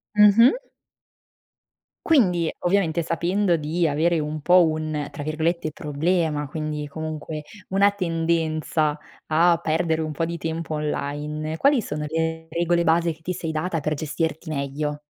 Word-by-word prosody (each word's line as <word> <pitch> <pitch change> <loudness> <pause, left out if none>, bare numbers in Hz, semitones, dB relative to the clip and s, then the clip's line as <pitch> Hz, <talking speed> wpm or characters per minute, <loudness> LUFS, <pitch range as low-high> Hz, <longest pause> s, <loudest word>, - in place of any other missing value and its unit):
Mh-mh. 210 - +6 1.5
Quindi, 180 - +3
ovviamente 175 -3 +1
sapendo 175 +2 +1
di 160 +3 -1
avere 160 +3 +1
un 150 +1 -4
po' 180 +3 +6
un 155 -2 -2
tra 145 - -6
virgolette 155 +1 -1
"problema", 150 0 -1
quindi 150 0 -4
comunque 155 0 -5 0.3
una 200 +1 +4
tendenza 165 -4 0 0.3
a 170 +2 +3
perdere 160 0 0
un 155 -1 -3
po' 165 - -2
di 170 +1 -2
tempo 160 0 -3
online, 150 +1 -3
quali 280 - +4
sono 150 -6 -4
le 160 +1 -2
regole 170 0 +1
base 170 +1 +3
che 155 - -22
ti 180 +3 -3
sei 165 -2 -4
data 160 +1 -2
per 155 +1 -1
gestirti 160 +2 -3
meglio? 145 0 -3
160 Hz, 140 wpm, -24 LUFS, 155-170 Hz, 1.5 s, Mh-mh